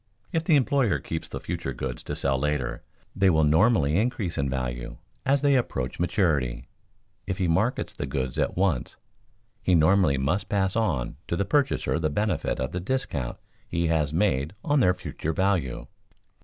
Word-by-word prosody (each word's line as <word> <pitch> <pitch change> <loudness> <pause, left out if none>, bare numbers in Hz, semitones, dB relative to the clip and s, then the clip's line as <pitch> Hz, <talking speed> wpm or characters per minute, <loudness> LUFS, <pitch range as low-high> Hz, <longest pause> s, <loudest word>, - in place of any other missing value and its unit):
If 165 -1 0
the 165 -1 +4
employer 135 -4 +2
keeps 80 - -5
the - - -6
future 65 - -4
goods 65 0 -4
to - - -3
sell 70 -1 0
later, 65 -4 -1 0.3
they 95 0 +4
will 80 -3 +3
normally 80 0 +4
increase 105 -5 -1
in 70 -1 0
value 60 -2 -4 0.3
as 140 +1 +3
they 140 -1 +4
approach 70 - -1
maturity; 80 - 0 0.6
if 95 - -2
he 90 - 0
markets 105 +10 0
the 70 - -4
goods 65 -2 -2
at - - 0
once, 90 -9 0 0.7
he 90 - +3
normally 85 -2 +4
must 80 +10 -1
pass 95 -1 +1
on 80 - 0
to - - -1
the 100 - 0
purchaser 135 - +1
the 80 -2 0
benefit 105 +5 -1
of 65 +1 -2
the 90 - -3
discount 90 - -2 0.3
he 85 -1 0
has 75 -3 +1
made 80 -2 +1
on 145 -3 +2
their 90 -7 +4
future 80 -2 -4
value. 90 -9 0
85 Hz, 170 wpm, -26 LUFS, 70-100 Hz, 0.7 s, the